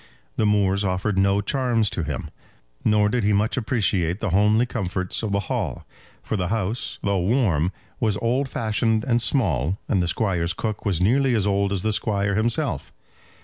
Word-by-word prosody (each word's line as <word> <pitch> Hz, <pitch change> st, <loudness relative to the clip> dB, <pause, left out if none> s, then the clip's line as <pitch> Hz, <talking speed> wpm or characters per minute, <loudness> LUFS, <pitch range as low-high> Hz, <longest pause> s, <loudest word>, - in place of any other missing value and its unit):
The 110 Hz, -, +1 dB
moors 100 Hz, -1 st, +2 dB
offered 95 Hz, +2 st, -1 dB
no 100 Hz, +1 st, +3 dB
charms 120 Hz, -1 st, +1 dB
to -, -, -2 dB
him. 75 Hz, -, -4 dB, 0.5 s
Nor 105 Hz, -1 st, +3 dB
did 120 Hz, +2 st, 0 dB
he 105 Hz, +1 st, +2 dB
much 105 Hz, +3 st, +1 dB
appreciate 105 Hz, -7 st, 0 dB
the 110 Hz, -5 st, -2 dB
homely 105 Hz, +5 st, +3 dB
comforts 95 Hz, -6 st, -2 dB
of 110 Hz, -3 st, -3 dB
the 100 Hz, 0 st, +1 dB
Hall; -, -, -3 dB, 0.4 s
for -, -, -2 dB
the 90 Hz, -3 st, -1 dB
house, 110 Hz, +3 st, -2 dB
though 100 Hz, -1 st, +1 dB
warm, 90 Hz, -, +1 dB, 0.3 s
was 110 Hz, -5 st, +1 dB
old 125 Hz, +5 st, 0 dB
fashioned 110 Hz, -1 st, 0 dB
and 120 Hz, -1 st, +1 dB
small, 95 Hz, -, +1 dB
and 95 Hz, -, +1 dB
the 90 Hz, -, 0 dB
Squire's 90 Hz, -2 st, 0 dB
cook 110 Hz, -2 st, -4 dB
was 90 Hz, -4 st, 0 dB
nearly 130 Hz, +5 st, +3 dB
as 105 Hz, -3 st, +1 dB
old 100 Hz, 0 st, +1 dB
as 95 Hz, -3 st, -2 dB
the 110 Hz, 0 st, +1 dB
Squire 100 Hz, -2 st, 0 dB
himself. 115 Hz, -, -1 dB
105 Hz, 180 wpm, -23 LUFS, 95-115 Hz, 0.5 s, no